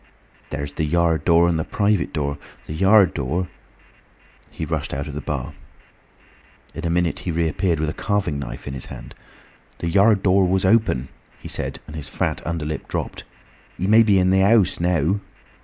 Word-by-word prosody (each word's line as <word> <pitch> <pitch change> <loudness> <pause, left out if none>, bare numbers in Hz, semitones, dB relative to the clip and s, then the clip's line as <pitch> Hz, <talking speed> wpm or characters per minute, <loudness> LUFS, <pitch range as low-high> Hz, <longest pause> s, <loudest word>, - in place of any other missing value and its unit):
"There's 70 -1 -5
the 80 - -2
yard 80 0 +1
door 85 0 +5
and 85 -2 +1
the - - 0
private 100 +1 0
door. 70 -2 -2 0.3
The - - -6
yard 95 +2 +5
door—" 85 +6 -2 1.0
He - - -5
rushed - - -3
out 70 +1 -3
of 75 - -7
the 75 - -4
bar. 70 -5 -4 1.2
In - - -4
a - - -1
minute 85 0 0
he 90 - -3
reappeared 85 +1 0
with 80 - 0
a 75 - -2
carving 100 -9 -1
knife 70 - -7
in 70 - -4
his 65 - -6
hand. - - -10 0.6
"The 85 - -3
yard 100 +3 +4
door 95 -1 +4
was 95 +1 +1
open!" 95 - +2 0.3
he - - -10
said, - - -2
and 75 - -10
his 75 -3 -7
fat - - -2
underlip 80 -2 -3
dropped. - - -4 0.5
"He 95 - -2
may 110 +3 +6
be 105 -3 +4
in 90 0 +3
the 95 - +4
house 100 0 +4
now!" 85 +2 +1
85 Hz, 185 wpm, -22 LUFS, 75-95 Hz, 1.2 s, may